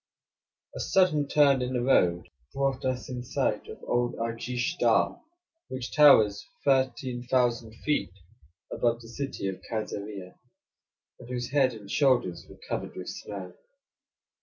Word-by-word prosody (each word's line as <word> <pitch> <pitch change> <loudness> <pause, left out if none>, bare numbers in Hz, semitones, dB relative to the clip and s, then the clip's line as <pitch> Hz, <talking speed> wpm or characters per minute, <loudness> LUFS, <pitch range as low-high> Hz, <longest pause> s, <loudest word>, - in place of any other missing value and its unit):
A - - -5
sudden 155 -7 +2
turn 140 -3 +4
in 125 +1 -2
the 125 -1 0
road 90 -9 +3
now - - -24 0.2
brought 135 -1 0
us 130 -1 -2
in 125 -1 -5
sight - - -1
of - - -10
old 120 0 0
Arjish 120 +7 -3
Dagh, - - +3 0.5
which 130 -1 -6
towers 110 -9 +6 0.2
13,000 125 -3 +1
feet 150 - +1 0.6
above 120 -1 +1
the 115 - -12
city 125 -4 -4
of 95 -1 -5
Kaisarieh, 105 -3 -5 0.9
and 125 - -12
whose 125 -1 -4
head 135 -4 +3
and 100 -2 -10
shoulders 125 - +2
were - - -13
covered - - -4
with - - -6
snow. 95 -3 -7
125 Hz, 135 wpm, -28 LUFS, 110-135 Hz, 0.9 s, towers